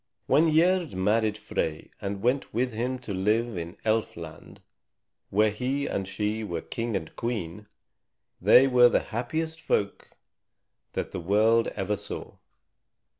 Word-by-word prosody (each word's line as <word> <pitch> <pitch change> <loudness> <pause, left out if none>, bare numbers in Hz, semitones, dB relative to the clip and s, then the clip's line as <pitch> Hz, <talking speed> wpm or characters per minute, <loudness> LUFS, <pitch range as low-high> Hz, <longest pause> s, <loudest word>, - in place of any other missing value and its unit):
When 160 +1 +4
Gerd 175 - +3
married 105 +3 +1
Frey 80 -6 -3
and 100 0 -4
went 130 +3 +1
with 125 +1 0
him 125 +4 -2
to 100 - -4
live 110 +4 +1
in 85 +2 -6
Elf 110 -3 0
Land, 80 -2 -10 0.7
where 105 +2 +3
he 130 +6 -2
and 95 -7 -2
she 105 +2 -2
were 85 -5 -3
king 115 -2 -3
and 80 -5 -4
queen, 105 -4 -4 0.7
they 130 - +7
were 125 -2 +6
the - - +2
happiest 160 +7 -2
folk 100 -1 -1 0.8
that - - -3
the - - -4
world 110 +6 +3
ever 100 +2 -1
saw. 100 - -8
110 Hz, 140 wpm, -27 LUFS, 100-125 Hz, 0.8 s, they